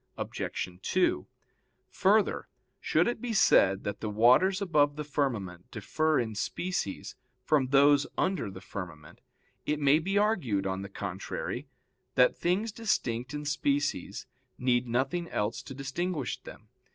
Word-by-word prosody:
Obj. 90 0 -4
2: 185 - +1 0.6
Further, 205 +2 +2 0.3
should - - +2
it 240 -2 -2
be 245 -2 -3
said 95 - +4
that 105 0 -4
the 110 - -3
waters 125 - +4
above 150 -7 +2
the 150 - -4
firmament 115 - -3
differ 155 -1 0
in 115 -3 -2
species 105 - -3 0.3
from 145 -4 +2
those 140 +1 +5
under 185 - 0
the 95 -1 -10
firmament, 85 -6 -9 0.5
it 150 0 0
may 145 +1 +4
be 195 +5 -1
argued, 170 - +1
on 95 0 -2
the 100 - -7
contrary, - - -5 0.5
that 125 -1 +5
things 195 +6 0
distinct 130 - -1
in 150 0 -5
species 145 -9 -1 0.3
need 125 -1 +1
nothing 135 +8 -1
else 105 +3 -2
to 135 - -9
distinguish 140 +3 -3
them. 110 0 -13
140 Hz, 140 wpm, -29 LUFS, 105-175 Hz, 0.6 s, those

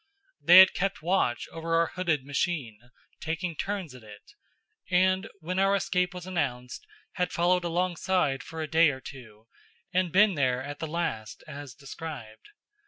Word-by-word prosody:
They 175 - +8
had 190 0 +9
kept 195 -3 -2
watch 170 -9 0
over 165 0 -2
our 165 0 +2
hooded 165 -7 -1
machine, 135 -6 -3 0.3
taking 165 +1 -3
turns 195 -5 -4
at 125 - -12
it; 105 -2 -14 0.6
and 185 +3 +2
when 180 +4 -2
our 195 +1 +3
escape 180 -2 0
was 180 -1 -7
announced, 130 -9 -3 0.3
had 180 0 0
followed 175 +1 +2
along 175 +1 -1
side 155 -9 0
for 160 -1 -6
a - - -4
day 160 +1 +5
or 130 -2 -4
two, 115 -6 -12 0.5
and 180 -1 +1
been 200 +3 +5
there 130 -4 0
at 145 +1 -7
the 160 - -3
last, 150 -10 -4
as 140 -3 -9
described. 140 -5 -9
165 Hz, 165 wpm, -28 LUFS, 135-180 Hz, 0.6 s, had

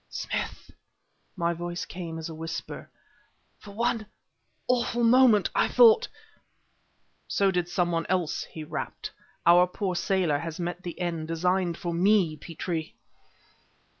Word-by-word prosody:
"Smith" - - -4 0.6
my 170 -2 0
voice 175 +1 -5
came 170 -3 -7
as 160 - -5
a 165 - -7
whisper 165 +1 -6 0.7
"for 210 - -13
one 225 +1 -1 0.6
awful 240 -1 +1
moment 230 -3 +5
I - - +3
thought 465 0 +6 0.6
" - - -43 0.3
"So 195 -1 +2
did 180 -1 -1
some 175 0 0
one 165 0 -1
else," 180 -4 0
he 160 - -9
rapped. 150 - -5 0.3
"Our 175 +1 +7
poor 185 +1 -3
sailor 175 -5 +1
has 165 +1 -6
met 175 +1 -3
the 175 -1 -7
end 170 -3 -2
designed 175 +1 0
for 170 -1 -4
me, 180 -2 +3
Petrie!" 160 +1 -5
175 Hz, 135 wpm, -27 LUFS, 165-200 Hz, 0.7 s, Our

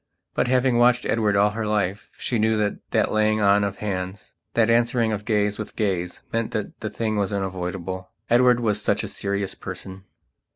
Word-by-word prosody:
But, - - +1
having 125 -1 +3
watched 125 0 +4
Edward 110 -3 +1
all 105 +1 +4
her 110 +1 -3
life, 100 -2 -1
she 120 - -1
knew 110 0 +2
that 105 -1 0
that - - +1
laying 110 0 +2
on 100 0 +4
of 100 -1 -1
hands, 95 0 -5 0.2
that 115 -2 +4
answering 115 0 +2
of 105 -1 -3
gaze 105 -1 +1
with 110 - -6
gaze, 90 -4 -2
meant 115 -1 -1
that 105 -2 -4
the 110 - -3
thing 110 +1 -2
was 100 -1 0
unavoidable. 95 -1 -4 0.2
Edward 120 0 +5
was 105 -3 +1
such - - +1
a - - -3
serious 100 -1 -2
person. 95 0 -8
105 Hz, 190 wpm, -24 LUFS, 100-115 Hz, 0.2 s, Edward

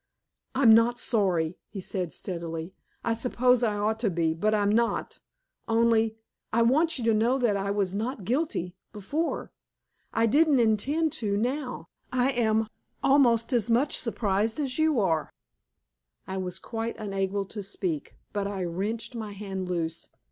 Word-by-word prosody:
"I'm 250 -4 +7
not 230 +2 +4
sorry," 180 -7 +1
he 200 - -7
said 180 -2 -3
steadily. 170 -1 -4 0.3
"I 230 - +1
suppose 250 +1 +2
I 220 -3 +1
ought 215 +2 0
to 225 -3 +1
be, 165 -2 +1
but 210 +7 0
I'm 205 -1 +2
not. 235 +2 0 0.5
Only 225 -1 +2 0.3
I 230 +1 +3
want 310 +7 +3
you 245 - -3
to 225 - +4
know 230 +5 +2
that 240 -6 +2
I 200 0 -2
was 200 -2 0
not 220 +1 -3
guilty 235 - -1 0.2
before. 285 - -3 0.6
I 225 - +2
didn't 290 +4 +4
intend 275 +9 +2
to 200 -2 0
now. 250 +3 -2 0.2
I 255 +1 +2
am 220 -3 +1 0.4
almost 255 -3 +4
as 235 -1 +1
much 250 +5 +2
surprised 220 0 0
as 270 -1 -1
you 315 -5 +3
are." 165 -6 0 0.9
I 190 - -5
was 185 -1 -3
quite 225 0 -4
unable 195 -1 -2
to 205 +2 -6
speak, 185 -6 -4 0.2
but 200 -1 -1
I 195 -2 -3
wrenched 200 +8 -3
my 220 -3 -5
hand 190 -2 -5
loose. 165 -2 -2
220 Hz, 155 wpm, -27 LUFS, 195-245 Hz, 0.9 s, I'm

